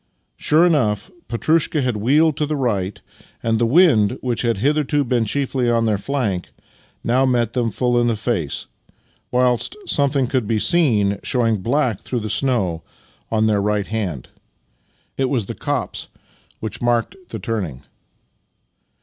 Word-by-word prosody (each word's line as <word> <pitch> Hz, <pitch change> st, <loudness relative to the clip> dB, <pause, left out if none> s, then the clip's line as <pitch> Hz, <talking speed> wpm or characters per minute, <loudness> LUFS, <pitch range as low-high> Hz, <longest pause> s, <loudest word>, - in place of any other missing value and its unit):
Sure 160 Hz, +3 st, +3 dB
enough, 115 Hz, -, +1 dB, 0.2 s
Petrushka 155 Hz, +5 st, +1 dB
had 125 Hz, -3 st, 0 dB
wheeled 145 Hz, +8 st, +3 dB
to 150 Hz, -, 0 dB
the 155 Hz, -, -1 dB
right, 105 Hz, -8 st, -1 dB, 0.4 s
and 115 Hz, -1 st, +1 dB
the 120 Hz, -, +2 dB
wind, 130 Hz, -, +4 dB
which 125 Hz, -2 st, -2 dB
had 115 Hz, -3 st, 0 dB
hitherto 145 Hz, +4 st, +1 dB
been 120 Hz, -3 st, +1 dB
chiefly 130 Hz, +1 st, 0 dB
on 115 Hz, -1 st, +2 dB
their 105 Hz, -3 st, +1 dB
flank, 105 Hz, -7 st, -2 dB, 0.5 s
now 125 Hz, +3 st, +2 dB
met 120 Hz, -3 st, +1 dB
them 120 Hz, -2 st, 0 dB
full 120 Hz, +3 st, +1 dB
in 120 Hz, -, +2 dB
the 115 Hz, -, +1 dB
face, 100 Hz, -, -2 dB, 0.6 s
whilst 125 Hz, -, +1 dB
something 140 Hz, -, +1 dB
could 125 Hz, -3 st, -1 dB
be 115 Hz, 0 st, +1 dB
seen 105 Hz, -, +2 dB
showing 115 Hz, -3 st, +1 dB
black 120 Hz, +1 st, 0 dB
through 125 Hz, -3 st, -3 dB
the 110 Hz, -1 st, -4 dB
snow 100 Hz, -12 st, 0 dB, 0.5 s
on 110 Hz, -1 st, +1 dB
their 105 Hz, -2 st, +2 dB
right 105 Hz, 0 st, 0 dB
hand. 95 Hz, -, -4 dB, 0.9 s
It 135 Hz, -1 st, +1 dB
was 120 Hz, -7 st, 0 dB
the -, -, -5 dB
copse -, -, -3 dB, 0.5 s
which 110 Hz, +1 st, -5 dB
marked 120 Hz, -, +1 dB
the 110 Hz, -, -5 dB
turning. 95 Hz, -, -4 dB
120 Hz, 150 wpm, -20 LUFS, 105-135 Hz, 0.9 s, wind